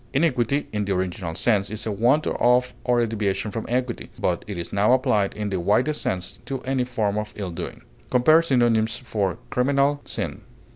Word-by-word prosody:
Iniquity, 140 -2 +1
in 105 -1 -1
the 100 -1 0
original 90 -2 -3
sense, 100 -2 +2
is 110 +1 -4
a 110 - -1
want 120 +9 +2
of 125 +1 +2
or 125 -1 +2
a - - +3
deviation 105 -2 -2
from 110 +2 -4
equity; 125 0 -2
but - - -1
it 100 -3 -5
is 85 - -6
now 105 +4 +4
applied 125 -7 +2
in 105 -1 -2
the 95 - -1
widest 120 - +1
sense 90 -1 -2
to 135 -1 -3
any 130 -1 0
form 105 -4 -1
of 105 0 -6
ill 100 -4 -4
doing. 85 - -7 0.3
Compare 155 +6 +5
synonyms 120 -7 +2
for 105 -6 -2
CRIMINAL; 140 +3 +2
SIN. - - -4
115 Hz, 190 wpm, -24 LUFS, 100-130 Hz, 0.3 s, Compare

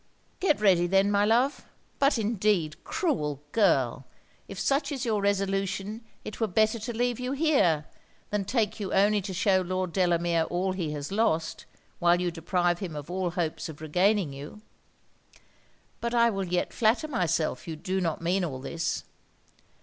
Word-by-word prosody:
'Get 370 -6 +2
ready 185 -4 +4
then, 195 +2 +3
my 205 0 +3
love. 245 +6 +2 0.4
But 275 -1 +3
indeed, 205 -7 0
cruel 150 - -1
girl, 135 - +2 0.4
if 195 - -8
such 280 +3 +1
is 270 -2 -3
your 215 -3 0
resolution 195 +1 -1 0.2
it - - -7
were 225 - +1
better 215 +4 +2
to 230 +1 -5
leave 245 0 0
you 250 +1 -2
here, 235 - +2 0.5
than 205 -1 0
take 225 -1 0
you 195 -3 -4
only 205 +1 +4
to 195 +1 -5
shew 190 +1 +2
Lord 185 -1 -2
Delamere 170 -3 +2
all 185 +2 0
he 175 -5 -3
has 145 +1 -5
lost, 195 -7 0 0.3
while 175 0 +4
you 180 -1 0
deprive 175 +1 0
him 175 -6 -5
of 150 +3 -7
all 185 -1 -1
hopes 170 -2 -3
of 150 - -9
regaining 180 +1 +1
you. 145 +10 -9 1.4
But 235 +1 -2
I 235 0 +5
will 195 -2 -3
yet 180 0 -1
flatter 235 +7 +2
myself 180 - -1
you 160 - -4
do 190 +4 -2
not 165 -2 -2
mean 180 +3 +1
all 145 -7 -3
this. 165 +5 -3
190 Hz, 165 wpm, -27 LUFS, 170-215 Hz, 1.4 s, I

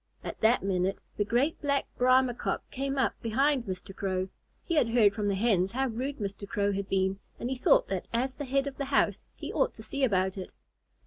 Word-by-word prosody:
At - - -6
that 225 0 +4
minute 190 0 0 0.2
the 205 - +1
great 245 +9 +1
Black 280 -1 +1
Brahma 255 0 +4
Cock - - -3
came 275 +1 -2
up 265 - +2
behind 260 +3 +2
Mr. 190 0 -6
Crow. 190 -1 -1 0.3
He 340 - -3
had 295 -8 +3
heard 225 -4 +5
from 210 -1 -2
the 200 - +1
Hens 195 -2 +2
how 265 +1 0
rude 260 +5 -3
Mr. 200 -1 -5
Crow 200 0 +1
had 200 0 -3
been, 190 0 +1 0.2
and 245 - -3
he - - 0
thought - - +4
that - - -3
as 255 +3 0
the 290 - -6
head 275 +1 +1
of 280 -1 -5
the 280 - -2
house 275 +1 +2
he - - -6
ought - - +1
to 220 - -10
see 275 +5 -3
about 190 -5 +1
it. 185 - -6
235 Hz, 220 wpm, -29 LUFS, 195-270 Hz, 0.3 s, heard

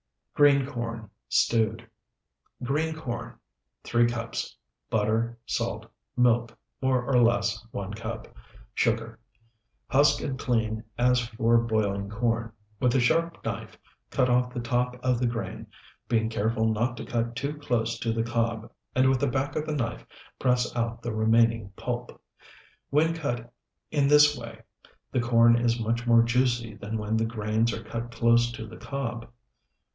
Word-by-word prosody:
GREEN 140 -2 +5
CORN 115 -4 -5 0.2
(STEWED) 115 0 +1 0.8
Green 155 +5 0
corn, 125 -7 -5 0.5
3 120 0 +3
cups. 115 -1 -4 0.3
Butter. 110 +2 0
Salt. - - -2 0.3
Milk, 120 -1 +2 0.2
more 130 -2 +2
or 125 -1 +3
less, 110 -2 +2
1 100 -2 -5
cup. 110 - -6 0.5
Sugar. 110 0 0 0.7
Husk 145 +2 +4
and 135 -2 -3
clean 110 -4 0
as 125 +1 +4
for 115 0 +2
boiling 105 -4 -1
corn; 115 +1 -1 0.3
with 125 0 +2
a - - +5
sharp 165 +7 +1
knife - - -5 0.3
cut 125 - +2
off 125 0 +2
the 125 - -4
top 125 +1 0
of 125 -2 +2
the 125 - +1
grain, 115 -5 -4 0.4
being 110 -1 +2
careful 110 0 0
not 120 +3 -1
to - - -6
cut 120 -2 -2
too 140 +4 -2
close 120 -6 -1
to 115 - -1
the 115 0 0
cob 115 -1 -1 0.2
and 130 +1 +4
with 130 -1 +3
the 140 - +1
back 135 +1 -1
of 155 - -2
the 155 - -1
knife 115 -5 -3 0.3
press 125 -2 +1
out 115 0 -2
the 120 -2 -3
remaining 115 -1 +3
pulp. 120 +2 -5 0.7
When 160 +3 +3
cut 120 -7 -4 0.4
in 145 -2 +2
this 150 0 +6
way, 115 -2 -9 0.5
the - - +1
corn 115 0 +5
is 120 0 +1
much 120 +2 -1
more 115 -1 +6
juicy 120 -2 +1
than 105 +1 -5
when 105 +1 -1
the 110 - +1
grains 110 0 0
are 115 - -5
cut 115 0 -5
close 115 0 +3
to 110 - -6
the 110 - -11
cob. 120 -4 -5
120 Hz, 155 wpm, -27 LUFS, 115-125 Hz, 0.8 s, this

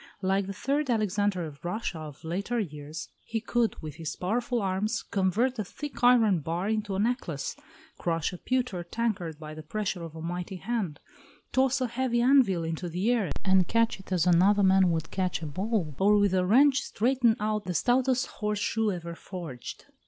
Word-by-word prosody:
Like 190 +1 +1
the - - -3
third 280 +6 -1
Alexander 205 -5 +1
of 145 -2 -10
Russia 175 -1 -3
of 150 -1 -9
later 200 +9 -2
years, 155 -4 -6
he 225 - -3
could, 230 0 0
with 155 -1 -7
his 160 -2 -4
powerful 235 +6 -1
arms, 200 +3 -1
convert 215 +6 0
a - - +1
thick 280 +6 -8
iron 230 -7 +5
bar 165 +5 -2
into 215 -2 -1
a - - -1
necklace, 205 - -1 0.4
crush 165 -1 -1
a 180 - -8
pewter 250 -9 -1
tankard 185 -5 -2
by 155 0 -8
the 155 - -8
pressure 185 +3 -3
of 165 -1 -8
a 160 - -7
mighty 175 +3 -4
hand, 195 -6 -3 0.5
toss 265 +1 +2
a 255 - +1
heavy 240 0 0
anvil 240 -9 +4
into 165 +2 -3
the 185 +8 0
air 220 -8 +1 0.2
and 190 -2 +4
catch 230 -2 +2
it 190 - -14
as 180 -3 +2
another 190 +4 +5
man 190 -1 +5
would 165 -1 -2
catch 185 -3 -1
a - - -2
ball, 185 +1 -1
or 205 +2 +5
with 205 -2 +3
a 185 -1 +2
wrench 270 +6 +5
straighten 240 0 +2
out 210 0 -1
the 180 - -3
stoutest 255 +4 +2
horse 210 -1 -3
shoe 220 +1 0
ever 170 -2 -5
forged. 165 -8 -8
195 Hz, 190 wpm, -28 LUFS, 170-230 Hz, 0.5 s, iron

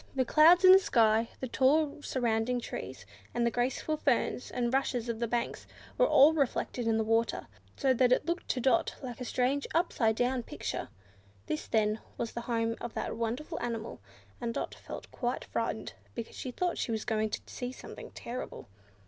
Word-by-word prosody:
The 260 -1 +2
clouds 335 +7 +6
in 370 - +10
the 380 - +10
sky, 225 - +3
the 260 - -2
tall 285 +4 +2
surrounding 240 -2 0
trees, 130 - -7 0.3
and 240 - +2
the 235 - +2
graceful 255 +6 -1
ferns 260 -3 0
and 240 0 -1
rushes 250 -3 0
of 225 -1 -2
the 235 - 0
banks, 235 +1 -2 0.3
were - - +4
all 300 - +7
reflected 260 -4 -1
in 225 -1 +3
the 220 - +1
water, 225 +1 +1 0.3
so 265 -1 +3
that 250 0 +3
it 255 - +3
looked 345 +1 -2
to 255 - 0
Dot 270 +7 +2
like 250 -1 -6
a - - -3
strange 260 +4 0
upside 245 -10 +2
down 250 +2 +1
picture. - - -5 0.6
This, 150 - -3
then, 215 0 +1 0.2
was 230 - -3
the 235 - -5
home 230 -1 0
of 240 - -6
that - - -3
wonderful 235 +8 -3
animal; 230 -2 -4 0.4
and 235 -1 -2
Dot - - -3
felt - - -9
quite 245 0 -2
frightened, - - -3 0.2
because 230 -2 -6
she 255 - -5
thought 355 +8 -1
she 235 - -1
was 220 -2 -2
going 220 -2 0
to - - -4
see 250 0 -5
something - - -10
terrible. 245 - -7
245 Hz, 190 wpm, -31 LUFS, 230-270 Hz, 0.6 s, in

